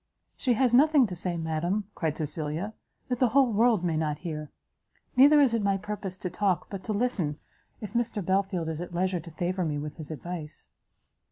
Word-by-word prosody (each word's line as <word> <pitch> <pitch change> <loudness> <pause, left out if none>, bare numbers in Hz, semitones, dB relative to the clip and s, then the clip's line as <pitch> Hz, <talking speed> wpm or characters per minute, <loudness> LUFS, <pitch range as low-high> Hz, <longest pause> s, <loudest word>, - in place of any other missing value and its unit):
"She 250 - +1
has 245 0 +2
nothing 290 +1 +6
to 185 -5 -5
say, 175 0 -2
madam," 165 +5 -1
cried 155 -2 -2
Cecilia, 155 +6 -3 0.3
"that 250 -2 -2
the 255 - +5
whole 260 -1 +4
world 220 -3 +3
may 170 -3 0
not 155 -1 0
hear. 150 -3 -4 0.7
Neither 285 +4 +7
is 270 -5 +4
it 230 - +1
my 200 -1 +2
purpose 200 -2 -5
to 185 - -4
talk, 185 -2 0
but 195 -2 -5
to 220 - -2
listen, 205 -9 0 0.4
if 210 - -7
Mr 235 -5 -1
Belfield 190 -3 0
is 160 0 -3
at 175 0 -7
leisure 185 0 +1
to 170 +1 -10
favour 180 +3 -2
me 150 -3 -1
with 150 0 -6
his 155 -3 -8
advice." 160 0 -7
185 Hz, 195 wpm, -28 LUFS, 160-220 Hz, 0.7 s, Neither